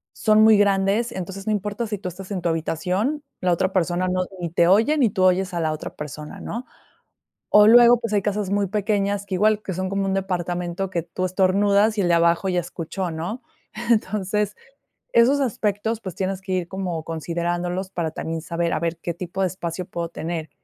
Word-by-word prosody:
son 215 0 +4
muy 220 0 +7
grandes, 200 +3 +2
entonces, 195 +1 -6
no - - +2
importa 210 +3 -2
si 210 -1 -3
tú 195 -1 -6
estás 185 +2 -10
en 195 -3 -3
tu - - +1
habitación, 185 - -1 0.2
la 180 - +2
otra 185 +2 +1
persona 180 0 +1
no, 185 0 0
ni 170 -2 -4
te 170 0 +3
oye 220 - +4
ni 245 -5 +4
tú 190 -2 -1
oyes 185 0 +2
a - - -1
la 160 -1 0
otra 155 - -6
persona, 150 0 -8
¿no?, 240 +3 -6 0.8
o 210 0 +7
luego, 240 +1 +8
pues, 230 -2 -4
hay 205 -2 +2
casas 205 -1 -1
muy 200 0 +1
pequeñas 200 0 -1
que 190 - -2
igual, 215 +2 +3
que 190 - -5
son 185 +1 -2
como 195 0 -1
un 190 - 0
departamento 180 -1 -2
que 170 -3 -2
tú 175 +2 -5
estornudas, 200 +3 +3
y - - +4
el 180 - +1
de 170 - +4
abajo 170 +3 +2
ya 180 -1 +1
escuchó, 175 +1 -4
¿no? 175 +10 -5 0.5
Entonces, 210 -1 0 0.6
esos 260 +5 +5
aspectos, 220 -2 -1
pues, 185 -6 -7
tienes 190 0 -2
que 190 0 -4
ir 180 -2 -1
como 180 -4 -3
considerándolos 175 +3 -3
para 170 -4 -2
también 160 0 -4
saber, 170 +1 -2
a - - 0
ver 165 +1 -2
qué 170 +1 -4
tipo 180 +2 -5
de 190 - +3
espacio 175 0 -5
puedo 170 -2 -4
tener. 165 -1 -5
190 Hz, 205 wpm, -23 LUFS, 175-205 Hz, 0.8 s, luego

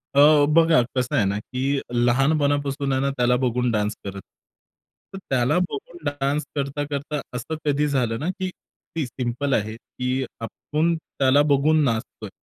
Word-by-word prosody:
अ, 145 0 +7
बघा, 165 -2 +5 0.2
कसं 125 -1 0
आहे 105 - +3
ना, 100 +1 0
की 135 +5 -2
लहानपणापासून 140 +3 +1
आहे 130 - +1
ना, 140 - +1
त्याला 125 0 +3
बघून 125 -1 +1
डान्स 105 -1 0
करत. 100 -1 -6 0.9
तर 195 - -5
त्याला 125 +4 +2
बघून 170 +5 -7
डान्स 145 +1 -1
करता-करता, 145 +1 -3
असं 125 +6 -4
कधी 150 0 +2
झालं 125 -5 0
ना, 160 - -2
की 185 0 -3 0.5
ती 155 -4 0
सिम्पल 125 +3 -2
आहे 110 0 0
की 125 +3 -3 0.2
आपण 155 +8 -1
त्याला 140 -3 +2
बघून 150 +2 +4
नाचतोय, 110 -3 -2
140 Hz, 150 wpm, -23 LUFS, 125-150 Hz, 0.9 s, अ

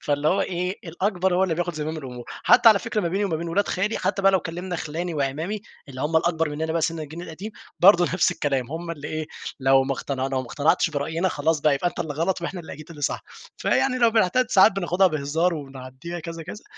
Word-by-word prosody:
فاللي 145 +1 +1
هو 195 +3 +2
إيه، 180 0 -2
الأكبر 185 +1 0
هو 185 - +3
اللي 170 -4 0
بياخد 175 0 -2
زمام 155 +1 -3
الأمور، 125 -5 -7 0.2
حتى 230 - +7
على 210 -2 +6
فكرة 215 - -2
ما 175 - -1
بيني 195 +4 0
وما 170 -5 -1
بين 170 +1 -5
ولاد 200 +4 +1
خالي، 200 +4 -1
حتى 195 - -1
بقى 195 0 +5
لو 190 - +3
كلِّمنا 175 +1 -5
خلاني 165 +2 -4
وأعمامي، 155 +9 -2 0.3
اللي 130 -1 -8
هم 155 +3 +1
الأكبر 165 -1 +1
مننا 160 +2 -3
بقي 165 -1 0
سن 165 0 0
الجيل 155 +3 -7
القديم، 180 +6 -7 0.3
برضه 175 -1 +7
نفس 180 +1 +2
الكلام 135 -3 -1
هم 170 +1 -5
اللي 150 -3 -6
إيه، 155 -1 -3 0.3
لو 135 0 +4
ما 135 - -1
اقتنع 135 -1 -3
لو 135 -1 -1
ما 130 - -8
اقتنعتش 160 +5 +2
برأينا 160 +5 -1
خلاص 155 0 0
بقى، 150 -2 +3
يبقى 175 +6 0
أنت - - -7
اللي 155 -3 -3
غلط 170 +3 -1
وإحنا 180 +1 -4
اللي 160 - -10
أكيد 155 +1 -10
اللي 150 -3 -10
صح، - - -1 0.3
فيعني 255 -1 +1
لو 235 -2 +5
بنحتدّ 225 +3 +2
ساعات 195 +2 +6
بناخدها 190 0 +2
بهزار 160 +2 0
وبنعدّيها 135 +4 -8
كذا، 165 0 -7
كذا، 210 +7 -9
165 Hz, 230 wpm, -24 LUFS, 150-185 Hz, 0.3 s, حتى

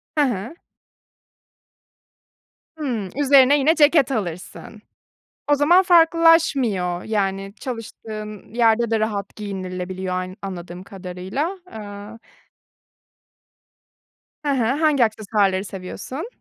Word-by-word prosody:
Hı 300 - +3
hı. 240 - -3 2.2
Hımm. 245 -11 -3
Üzerine 280 0 +5
yine 300 +4 +3
ceket 295 -3 +4
alırsın. 200 0 -5 0.7
O - - +7
zaman 315 +6 +5
farklılaşmıyor, 325 - +3
yani, 195 -2 -2
çalıştığın 215 -4 -8
yerde 235 -1 +3
de 225 -1 +1
rahat 205 -2 -3
giyinilebiliyor 185 -2 -5
ay 185 0 -4
anladığım 180 -2 -7
kadarıyla. 190 - -5
Iıı. 210 +1 -9 2.3
Hı - - 0
hı. 260 -4 +1 0.2
Hangi 300 -6 +4
aksesuarları 205 -3 0
seviyorsun? 200 - -7
220 Hz, 90 wpm, -22 LUFS, 190-280 Hz, 2.3 s, O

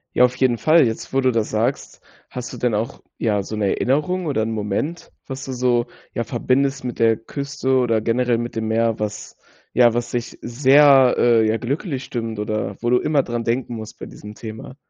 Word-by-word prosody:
Ja, 125 - +6
auf 125 0 -2
jeden 125 -3 +1
Fall. 155 +1 +5
Jetzt, 110 -1 -4
wo 135 - +1
du 130 -1 +3
das 115 -2 -1
sagst, 115 +5 -2 0.3
hast 125 -1 -7
du - - -7
denn 120 -3 0
auch, 115 +6 -3 0.2
ja, 105 -3 0
so 110 - -6
'ne 105 - -1
Erinnerung 160 +7 0
oder 135 -7 0
'n 115 - -2
Moment, 110 - -3
was 135 0 -6
du 130 - -5
so, 120 -1 +1 0.3
ja, 115 - -1
verbindest 135 +4 0
mit 125 -2 -5
der 115 -1 +4
Küste 135 +2 -2
oder 115 -3 +2
generell 120 +1 +1
mit 120 0 -5
dem 110 -1 -2
Meer, 115 0 +1
was 105 0 -5 0.4
ja, 120 -1 +5
was 120 0 -2
sich 120 -1 -4
sehr, 135 +1 +5
äh, 115 -2 +4
ja 110 - +1
glücklich 135 - -3
stimmt 115 -3 -4
oder 105 +1 -3
wo 120 0 0
du 125 - +4
immer 150 -3 +1
dran 120 -1 -3
denken 120 +1 -1
musst 110 -1 -8
bei - - -8
diesem 105 0 -11
Thema? 110 +3 -9
120 Hz, 210 wpm, -21 LUFS, 110-130 Hz, 0.4 s, Ja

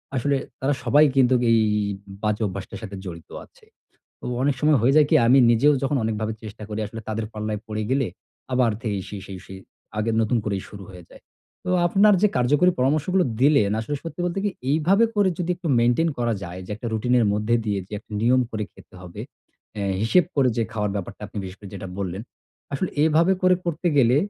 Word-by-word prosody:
আসলে 140 +2 +1 0.2
তারা 140 +2 +1
সবাই 145 +5 +5
কিন্তুক 130 -1 +4
এ - - +5
এই 115 - +5 0.6
বাজে 105 +1 0
অভ্যাসটার 95 +1 -7
সাথে 100 -1 -7
জড়িত 85 -3 -8 0.2
আছে। - - -25 0.6
তো - - -12 0.2
অনেক 140 +1 +2
সময় 150 -1 +4
হয়ে 135 +4 +4
যায় 150 -2 +6
কী? - - +4
আমি 130 +3 +6
নিজেও 130 +6 +4
যখন 135 +1 0
অনেকভাবে 110 0 -2
চেষ্টা 110 0 -9
করি, 105 0 -4
আসলে 115 +2 -8
তাদের 110 0 -2
পাল্লায় 105 -1 -4
পড়ে 110 -1 -3
গেলে 135 -2 +2 0.5
আবার 125 -2 +3
থেকেই 100 -4 -2
সেই 100 -2 -7
সেই 95 -1 -8
সেই 95 0 -9 0.4
আগের 110 +1 0
নতুন 115 +2 +1
করেই 100 -3 -2
শুরু 100 -2 -10
হয়ে 90 -2 -12
যায়। - - -16 0.4
তো 180 - -2 0.2
আপনার 205 +4 +5
যে 210 - +6
কার্যকরী 145 +8 +4
পরামর্শগুলো 155 +8 +2 0.2
দিলেন, 135 -8 +4
আসলে 145 +6 -4
সত্যি 165 +1 -7
বলতে 175 +2 -2
কী? 205 - +1 0.2
এইভাবে 175 +9 +3
করে 205 -2 +3
যদি 180 -1 -2
একটু 170 -3 -5
মেইনটেইন 120 +8 +3
করা 120 -2 0
যায় 90 +2 -7
যে, - - -12
একটা 120 +2 -7
রুটিনের 120 +2 +2
মধ্যে 105 +3 0
দিয়ে 105 -2 -1
যে - - -19
একটা 110 - -18
নিয়ম 125 +2 +4
করে 110 -1 -3
খেতে - - -18
হবে, 90 -2 -9 0.5
অ্যা 100 -1 -3 0.2
হিসেব 155 +10 +4
করে 135 -2 +4
যে 115 - +2
খাওয়ার 105 -2 -1
ব্যাপারটা, 100 +1 -6
আপনি 105 - -15
বিশেষ 95 +1 -8
করে 100 - -10
যেটা 95 0 -7
বললেন। 95 +1 -4 0.5
আসলে 180 +6 -2
এভাবে 165 +4 +4
করে 185 0 +5
করতে 170 +1 -1
গেলে 125 -1 +5
120 Hz, 205 wpm, -23 LUFS, 105-150 Hz, 0.6 s, যায়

